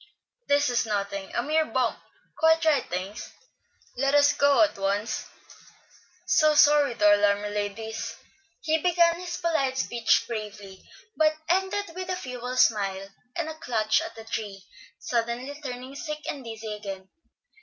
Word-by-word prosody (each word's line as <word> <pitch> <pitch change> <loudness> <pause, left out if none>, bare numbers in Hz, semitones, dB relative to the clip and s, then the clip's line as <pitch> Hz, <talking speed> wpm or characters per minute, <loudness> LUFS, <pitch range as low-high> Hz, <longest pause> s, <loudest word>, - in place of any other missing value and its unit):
"This 285 -2 +3
is 235 -1 +1
nothing, 200 -2 -3
a 235 - +1
mere 315 +3 +2
bump; 250 -3 -1 0.4
quite 320 0 +3
right, 300 -4 +2
thanks. 185 +3 -5 0.6
Let 275 +3 +1
us 285 0 +5
go 285 +1 +4
on 315 - +4
at - - -16
once; 200 +3 -1 1.0
so 310 -1 +4
sorry 290 -4 +5
to 210 -1 +6
alarm 205 0 +2
you, 205 - -4
ladies." 220 +2 -4 0.5
He 315 +1 +1
began 340 0 +3
his 350 -1 -5
polite 300 -7 0
speech 235 -3 +2
bravely, 210 -4 -7 0.3
but 310 0 +3
ended 380 +1 0
with 370 +1 -6
a 365 - 0
feeble 250 -4 -6
smile 195 -5 +2 0.3
and 335 -2 -2
a 315 - -4
clutch 220 -7 +1
at - - -7
the 225 - -9
tree, 205 -4 -5 0.3
suddenly 240 +3 -2
turning 255 -1 -7
sick 300 +1 -5
and 280 -3 -4
dizzy 225 -2 -6
again. 195 -2 -7
245 Hz, 155 wpm, -26 LUFS, 210-305 Hz, 1.0 s, to